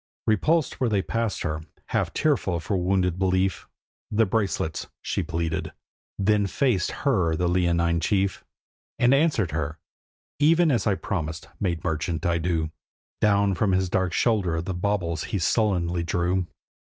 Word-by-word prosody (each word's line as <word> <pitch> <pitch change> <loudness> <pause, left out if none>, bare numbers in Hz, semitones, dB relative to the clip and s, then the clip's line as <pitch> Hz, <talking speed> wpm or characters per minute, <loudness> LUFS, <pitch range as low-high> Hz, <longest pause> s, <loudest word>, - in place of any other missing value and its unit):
Repulsed 150 - +1
where 125 - +3
they 100 -3 +1
passed 115 -1 -2
her, 75 +1 -2 0.3
half - - 0
tearful 115 - +1
for 100 +4 -2
wounded 90 -1 +1
belief, 95 -3 +1 0.4
'The 110 +2 +3
bracelets!' 95 -6 -1 0.2
she - - -1
pleaded. 80 0 -3 0.4
Then 105 0 +2
faced 110 -5 +1 0.2
her 90 - +2
the 90 +2 0
leonine 85 -1 +2
chief, 100 +1 0 0.5
And 120 +2 +4
answered 135 - +2
her: 75 0 -3 0.6
'Even 160 +2 +4
as 120 -3 +1
I 100 - +3
promised, 80 -4 -4
maid 85 -4 -1
merchant, 80 +2 -2
I 85 -1 +2
do.' 80 -2 -1 0.5
Down 100 -1 +3
from 95 +2 +1
his 95 0 +1
dark 95 -2 +1
shoulder 95 -7 +1
the 90 +3 -3
baubles 90 -3 -1
he 110 - -2
sullenly 90 -3 +1
drew. 90 +2 0
95 Hz, 145 wpm, -25 LUFS, 85-105 Hz, 0.6 s, And